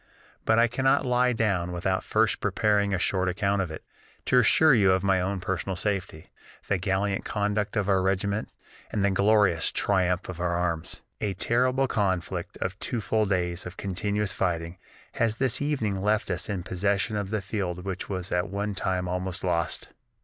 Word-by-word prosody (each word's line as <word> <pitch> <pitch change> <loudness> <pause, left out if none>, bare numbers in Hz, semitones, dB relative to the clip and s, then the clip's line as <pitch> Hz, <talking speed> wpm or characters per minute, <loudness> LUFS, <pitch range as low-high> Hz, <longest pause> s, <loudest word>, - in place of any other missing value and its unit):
But 110 - +3
I 115 - +6
cannot 135 +3 +2
lie 125 0 +3
down 100 -7 0
without 95 +2 -1
first 110 0 +1
preparing 105 0 +1
a 95 - +1
short 95 +1 +1
account 100 +2 0
of 90 - -2
it, 80 - -8 0.4
to 125 - +4
assure 155 +5 +5
you 100 -6 +5
of 95 0 0
my 95 -2 +3
own 95 +1 -1
personal 95 +1 -2
safety, 95 -4 -3 0.4
the 100 - +1
gallant 95 +2 0
conduct 105 0 -1
of 105 -3 0
our 95 -2 +3
regiment, 100 +3 0 0.4
and 100 -2 +1
the 100 - +3
glorious 100 -4 +3
triumph 90 -2 +1
of 90 -2 -7
our 85 -1 0
arms. 85 -2 -3 0.2
A 100 -3 -1
terrible 130 +6 +2
conflict 95 -7 -1
of 95 +2 -4
two 120 - -2
full 110 0 +1
days 90 -2 -1
of 90 - -10
continuous 100 +1 -1
fighting 85 -1 -2 0.4
has 115 -1 +2
this 125 +1 -1
evening 115 -10 -1
left 105 0 +1
us 90 +3 -2
in 95 -4 -2
possession 100 +3 0
of 100 -2 -2
the 110 0 -1
field 95 -2 -4
which 95 -1 -4
was 95 -2 -3
at 90 +2 0
one 100 +1 -2
time 90 -1 -1
almost 90 0 -3
lost. 85 -3 -1
100 Hz, 180 wpm, -27 LUFS, 90-105 Hz, 0.4 s, I